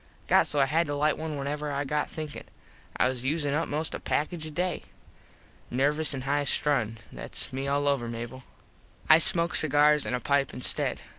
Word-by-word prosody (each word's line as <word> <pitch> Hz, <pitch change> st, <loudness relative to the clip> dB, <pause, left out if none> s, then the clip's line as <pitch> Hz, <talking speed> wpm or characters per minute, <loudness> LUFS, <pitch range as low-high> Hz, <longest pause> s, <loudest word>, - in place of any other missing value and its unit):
Got -, -, +3 dB
so 145 Hz, -, 0 dB
I 135 Hz, -, +4 dB
had 160 Hz, +4 st, 0 dB
to 145 Hz, -, -3 dB
lite 150 Hz, +1 st, +1 dB
one 155 Hz, -1 st, -5 dB
whenever 145 Hz, +2 st, -4 dB
I 140 Hz, 0 st, -2 dB
got 150 Hz, +1 st, -2 dB
thinkin. 155 Hz, -2 st, -7 dB, 0.5 s
I -, -, +3 dB
was 130 Hz, -1 st, -3 dB
usin 145 Hz, +1 st, -1 dB
up 160 Hz, +3 st, -1 dB
most 155 Hz, +2 st, -3 dB
a -, -, -5 dB
package 155 Hz, +1 st, -3 dB
a -, -, -4 dB
day. 175 Hz, +2 st, -3 dB, 0.8 s
Nervous 145 Hz, +4 st, +1 dB
an 130 Hz, -, -5 dB
high 145 Hz, +2 st, -1 dB
strung. 120 Hz, -7 st, 0 dB
Thats -, -, -4 dB
me 135 Hz, +1 st, -4 dB
all 145 Hz, +1 st, 0 dB
over, 135 Hz, -4 st, 0 dB
Mable. 120 Hz, +2 st, -7 dB, 0.7 s
I 155 Hz, -, +8 dB
smoke 170 Hz, +1 st, +6 dB
cigars 150 Hz, 0 st, +3 dB
an 125 Hz, -, -1 dB
a -, -, -3 dB
pipe 140 Hz, +1 st, 0 dB
instead. 125 Hz, -, +1 dB
145 Hz, 195 wpm, -27 LUFS, 135-155 Hz, 0.8 s, I